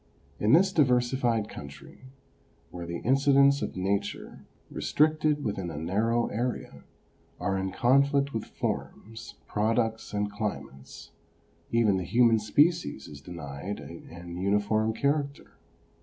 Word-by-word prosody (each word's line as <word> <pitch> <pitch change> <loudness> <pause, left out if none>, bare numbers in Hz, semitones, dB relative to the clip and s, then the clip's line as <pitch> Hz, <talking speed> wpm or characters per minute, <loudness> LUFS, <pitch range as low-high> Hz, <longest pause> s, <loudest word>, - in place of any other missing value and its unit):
In 105 +3 +3
this 190 +4 +5
diversified 125 - +2
country, 70 - -11 0.7
where 85 -1 -7
the 85 0 -5
incidents 140 +2 +4
of - - -4
Nature, 100 +2 -3 0.2
restricted 155 -1 +1
within 100 -6 -3
a 80 - -6
narrow 110 +9 +1
area, 120 +3 -4 0.6
are 100 -1 -1
in 95 0 -2
conflict 140 +4 +2
with 110 -2 -3
forms, 110 +1 -5
products 110 +1 -1
and 105 0 -1
chmates, 100 -10 -6 0.6
even 110 -4 +3
the 95 - -2
human 115 +4 +4
species 155 +11 +1
is 70 -1 -11
denied 85 +3 -6
an 85 +1 -10
uniform 105 +3 +1
character. 140 +3 -1
110 Hz, 115 wpm, -28 LUFS, 95-135 Hz, 0.7 s, this